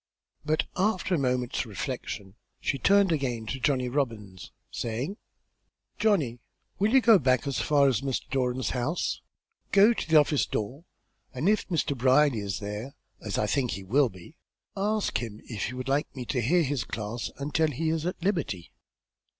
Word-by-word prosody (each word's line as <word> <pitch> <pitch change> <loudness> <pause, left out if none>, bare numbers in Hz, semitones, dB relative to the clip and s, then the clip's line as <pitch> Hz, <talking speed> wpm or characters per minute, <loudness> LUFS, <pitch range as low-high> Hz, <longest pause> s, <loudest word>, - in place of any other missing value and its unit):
But 155 0 +1
after 190 -1 +1
a 170 - +2
moment's 125 -2 0
reflection 105 -3 -5 0.3
she 135 - -1
turned 200 +4 +4
again 125 -7 -1
to 135 +4 -4
Johnny 130 -2 +1
Robbins, 115 -8 -3 0.2
saying: 125 - -3 0.8
"Johnny, 170 - +2 0.4
will 205 +3 +2
you 265 +1 +6
go 225 -4 +7
back 130 -1 +2
as 140 -2 -1
far 145 -2 +4
as 130 -1 +1
Mr. 135 -2 -2
Doran's 130 -1 0
house? 130 +7 -1 0.5
Go 205 +4 +6
to 220 - -5
the 160 - +3
office 150 -1 +2
door, 130 - -4 0.5
and 145 +8 -1
if 210 0 +2
Mr. 155 -5 0
Brierly 130 0 +4
is 100 -3 -3
there, 105 +6 -6 0.3
as 105 -3 -3
I - - +2
think 125 +2 0
he 95 - -6
will 130 +7 +3
be, 95 -4 -14 0.4
ask 210 +2 0
him 110 -3 -6
if 110 -4 -4
he 125 - -5
would 130 +1 -5
like 140 +3 0
me 125 -2 -5
to 125 +1 -1
hear 170 +9 +3
his 140 -4 -1
classes 110 +2 -4
until 150 +3 +1
he 155 +3 -2
is 160 -1 -1
at 180 -1 -4
liberty." 160 - -1
135 Hz, 175 wpm, -28 LUFS, 120-160 Hz, 0.8 s, go